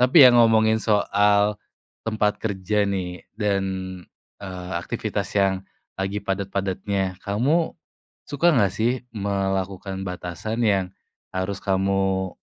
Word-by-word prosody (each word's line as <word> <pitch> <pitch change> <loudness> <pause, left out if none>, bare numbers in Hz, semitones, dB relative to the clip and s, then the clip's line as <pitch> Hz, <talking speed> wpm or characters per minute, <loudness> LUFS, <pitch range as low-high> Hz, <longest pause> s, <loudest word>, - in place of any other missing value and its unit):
Tapi 130 +3 +8
ya 125 - +9
ngomongin 110 -2 +5
soal 105 0 +2 0.4
tempat 105 -1 0
kerja 100 0 0
nih 90 -2 -3 0.2
dan, 100 -3 +1 0.8
eee, 90 -2 -7
aktivitas - - -3
yang 95 -1 +2 0.4
lagi 100 +1 -2
padat-padatnya. 95 -1 -2
Kamu 135 +12 0 0.5
suka 145 +4 +1
nggak 100 -5 +3
sih 110 +4 +1 0.2
melakukan 95 -2 -2
batasan 90 +6 -3
yang 100 -3 +3 0.5
harus 95 +1 -2
kamu, 95 -1 0
100 Hz, 105 wpm, -24 LUFS, 95-110 Hz, 0.8 s, ya